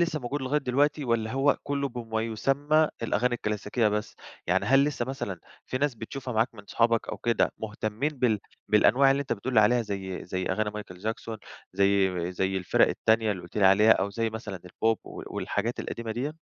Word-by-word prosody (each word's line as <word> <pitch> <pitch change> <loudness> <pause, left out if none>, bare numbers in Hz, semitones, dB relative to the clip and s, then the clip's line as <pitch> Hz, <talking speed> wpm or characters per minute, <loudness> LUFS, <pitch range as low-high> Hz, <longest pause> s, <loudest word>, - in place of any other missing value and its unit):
لسه 165 -3 0
موجود 135 +3 -3
لغاية 140 +3 +1
دلوقتي، 145 +3 +1
والّا 115 -2 0
هو 135 +2 +3
كله 140 0 -1
بما 115 -3 -3
يسمى 140 +7 +2
الأغاني 120 +2 +1
الكلاسيكية 105 +1 0
بس؟ 105 0 -3 0.3
يعني - - +2
هل 135 +2 +5
لسه 145 -5 -1
مثلًا 110 -9 -5 0.3
في 130 - -2
ناس 145 -2 +1
بتشوفها 125 +2 -6
معاك 115 +2 +1
من 105 -2 -13
صحابك 115 +1 +1
أو - - -3
كده 115 -2 +1
مهتمين 110 +5 -2
بال 115 -4 +2 0.3
بالأنواع 130 +6 +5
اللي 135 +1 +2
أنت 140 - -2
بتقول 120 +4 -3
لي 110 - +7
عليها 120 +3 +4
زي 95 -3 -5
زي 95 +2 -3
أغاني 110 -1 0
مايكل 105 -4 -8
جاكسون، 110 +2 -4 0.4
زي 95 -2 +2
زي 95 +1 -1
الفرق 95 - +3
التانية 110 -1 +2
اللي 90 -3 -7
قُلت 90 - -12
لي 100 - +3
عليها، 105 +3 +6
أو 100 +2 0
زي 115 +2 -1
مثلًا 105 -4 -6
البوب، 110 +5 0
و - - -8
والحاجات 115 +4 -2
القديمة 115 -1 -4
ديّة؟ 135 +7 -3
115 Hz, 195 wpm, -27 LUFS, 105-130 Hz, 0.4 s, لي